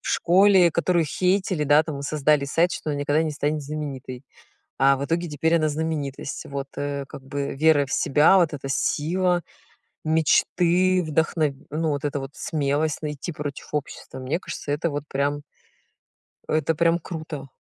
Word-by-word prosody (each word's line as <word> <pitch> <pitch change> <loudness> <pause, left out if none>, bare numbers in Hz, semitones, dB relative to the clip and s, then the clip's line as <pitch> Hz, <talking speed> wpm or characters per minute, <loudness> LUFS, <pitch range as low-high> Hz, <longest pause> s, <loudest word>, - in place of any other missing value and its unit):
в - - -7
школе, 185 0 +5
которую 170 +1 +1
хейтили, 185 0 0
да, 145 +2 +5
там 155 -3 -6
и - - -6
создали 150 0 +2
сайт, 170 +5 +2
что 155 - -4
она 145 - -2
никогда 145 +2 +1
не 160 - -1
станет 150 +1 -1
знаменитой. 140 -4 -6 0.6
А 135 +1 +5
в 140 - -3
итоге 170 +3 -1
теперь 160 +3 +1
она 155 -2 +2
знаменитость, 150 -3 -4
вот. 140 0 -5
Э, 140 -1 -3
как 135 - -11
бы, 140 +1 -4
вера 145 -1 +4
в - - -9
себя, 150 +7 +4
вот 170 -4 +2
эта 135 -1 -6
сила, 175 +6 +1 0.6
мечты, 175 +3 +3
вдохн 160 +1 0 0.3
ну, 160 +2 -1
вот 145 -1 -2
эта 145 -1 -1
вот 135 0 -6
смелость. 150 0 -1
Найти 150 +3 -4
против 145 -2 -6
общества. 145 -2 -5
Мне 130 +6 -2
кажется, 145 - -6
это 150 +3 0
вот 145 -1 -4
прям 145 +1 -1 1.1
это 155 +1 +1
прям 170 +2 +2
круто. 155 -5 -7
150 Hz, 165 wpm, -24 LUFS, 140-165 Hz, 1.1 s, школе